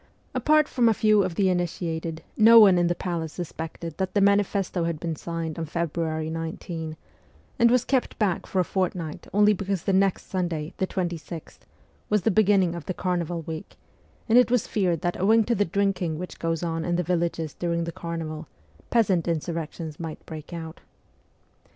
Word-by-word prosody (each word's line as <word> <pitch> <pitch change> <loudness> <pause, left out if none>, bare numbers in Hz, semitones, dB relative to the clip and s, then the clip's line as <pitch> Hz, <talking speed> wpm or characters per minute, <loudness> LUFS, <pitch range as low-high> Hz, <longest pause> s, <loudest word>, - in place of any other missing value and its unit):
Apart 305 0 +3
from 240 -2 +3
a 220 - +2
few 215 -1 +4
of 185 -3 -2
the 195 +1 +2
initiated, 165 -2 -2
no 230 +1 +8
one 195 -5 +7
in 175 - +3
the 175 - 0
palace 165 -3 -3
sus 175 -3 -5
pected 165 0 -6
that 190 +1 -2
the - - +4
manifesto 200 -3 +2
had 165 -2 -2
been 165 -1 -3
signed 165 0 -4
on 165 - -2
February 160 -1 -2
19, 160 0 -5 0.6
and 235 - +6
was 250 0 +3
kept 260 -2 0
back 200 -5 0
for 190 - -1
a - - +4
fortnight 175 -4 -3
only 210 +1 +5
because 195 -2 -2
the 195 - +1
next 195 0 +2
Sunday, 170 -5 -2
the 190 - 0
26th, 170 -4 -5 0.5
was 210 -2 +2
the 225 - +3
beginning 195 -4 +3
of 170 -3 -7
the 185 - -2
carnival 175 -2 -2
week, 160 0 -7 0.5
and 235 +1 +6
it 250 - +4
was 250 -2 +2
feared 180 -6 0
that, 175 0 -2
owing 220 +3 +5
to 235 - 0
the 205 -2 +2
drinking 185 -3 0
which 180 +2 -7
goes 165 0 -1
on 165 -1 -2
in 175 +1 0
the 180 - +1
villages 170 -2 -1
during 170 -1 -1
the 170 - -4
carnival, 165 -2 -5 0.4
peasant 195 -8 +2
insurrections 165 -1 -3
might 165 -2 -7
break 155 0 -9
out. 165 -2 -7
175 Hz, 185 wpm, -25 LUFS, 165-195 Hz, 0.6 s, no